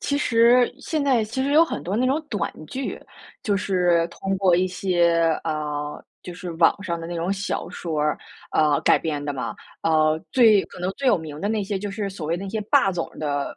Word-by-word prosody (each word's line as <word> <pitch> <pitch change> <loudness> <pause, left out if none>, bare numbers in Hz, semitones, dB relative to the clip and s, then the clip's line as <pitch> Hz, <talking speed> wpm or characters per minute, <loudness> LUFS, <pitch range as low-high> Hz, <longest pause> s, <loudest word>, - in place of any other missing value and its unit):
其 285 - -1
实 240 -1 +4
现 305 0 -2
在 255 -5 +3
其 230 +5 -3
实 275 - -1
有 315 +3 +7
很 335 - -5
多 190 +4 -2
那 250 +3 +2
种 275 +4 +1
短 205 -6 -2
剧， 265 - -5 0.4
就 205 -5 +1
是 180 -4 +2
通 195 +3 -3
过 185 -3 +4
一 185 +1 +2
些， 175 -2 +1 0.2
呃 150 -2 -3 0.2
就 180 - -8
是 180 0 -7
网 165 +4 +3
上 170 -4 -3
的 165 - -6
那 175 - -5
种 170 +3 -1
小 200 0 -3
说， 160 -4 -3 0.5
呃， 150 -2 +3
改 - - +5
编 150 -3 -3
的 145 - -2
嘛。 130 -2 -4 0.3
呃， 155 -1 +2
最 220 -6 +6
可 - - -13
能 180 +1 -1
最 275 - -3
有 215 - +5
名 155 -2 -8
的 205 - -1
那 215 -1 0
些 200 0 -2
就 205 +1 -5
是 200 0 -3
所 185 -5 -7
谓 165 +2 0
那 195 +3 -6
些 215 +2 -3
霸 195 - +4
总 175 -2 -3
的 145 -2 -2
185 Hz, 235 characters per minute, -23 LUFS, 165-215 Hz, 0.5 s, 有